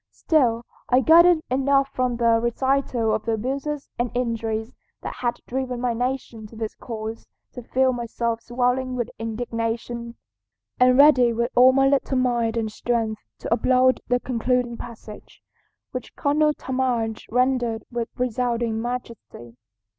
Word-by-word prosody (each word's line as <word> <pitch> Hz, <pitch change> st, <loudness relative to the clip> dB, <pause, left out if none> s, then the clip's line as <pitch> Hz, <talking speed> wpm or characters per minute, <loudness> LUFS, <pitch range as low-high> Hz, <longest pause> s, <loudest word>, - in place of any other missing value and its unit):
Still 240 Hz, -7 st, +1 dB, 0.2 s
I 255 Hz, +1 st, +4 dB
gathered 335 Hz, +3 st, +6 dB
enough 275 Hz, +1 st, +2 dB
from 250 Hz, -1 st, 0 dB
the 230 Hz, -1 st, +3 dB
recital 240 Hz, -2 st, 0 dB
of 215 Hz, 0 st, -1 dB
the 230 Hz, -, 0 dB
abuses 275 Hz, +6 st, -3 dB
and 240 Hz, 0 st, 0 dB
injuries 230 Hz, -2 st, -2 dB, 0.3 s
that -, -, -4 dB
had 240 Hz, -1 st, -2 dB
driven 255 Hz, -1 st, -3 dB
my 245 Hz, -1 st, 0 dB
nation 245 Hz, -2 st, -3 dB
to 225 Hz, -, -15 dB
this 220 Hz, -1 st, -4 dB
course 220 Hz, -1 st, -7 dB, 0.3 s
to 250 Hz, -, -7 dB
feel 260 Hz, +2 st, +1 dB
myself 235 Hz, -1 st, -3 dB
swelling 250 Hz, +2 st, -1 dB
with 240 Hz, -1 st, -3 dB
indignation, 230 Hz, +1 st, -4 dB, 0.6 s
and 250 Hz, 0 st, +5 dB
ready 255 Hz, -5 st, +6 dB
with 235 Hz, +2 st, -1 dB
all 255 Hz, +1 st, +7 dB
my 270 Hz, +1 st, +3 dB
little 270 Hz, -1 st, +1 dB
mind 240 Hz, -2 st, +1 dB
and 220 Hz, -1 st, -1 dB
strength 225 Hz, -1 st, -2 dB, 0.2 s
to -, -, 0 dB
applaud 255 Hz, +2 st, +3 dB
the 245 Hz, 0 st, +2 dB
concluding 245 Hz, 0 st, -1 dB
passage, 225 Hz, -3 st, -11 dB, 0.5 s
which -, -, -7 dB
Colonel 300 Hz, +1 st, +2 dB
Talmadge 250 Hz, -4 st, -2 dB
rendered 245 Hz, -2 st, +1 dB
with 235 Hz, -1 st, -3 dB
resounding 240 Hz, -2 st, -1 dB
majesty. 235 Hz, -, -7 dB
245 Hz, 140 wpm, -23 LUFS, 230-255 Hz, 0.6 s, all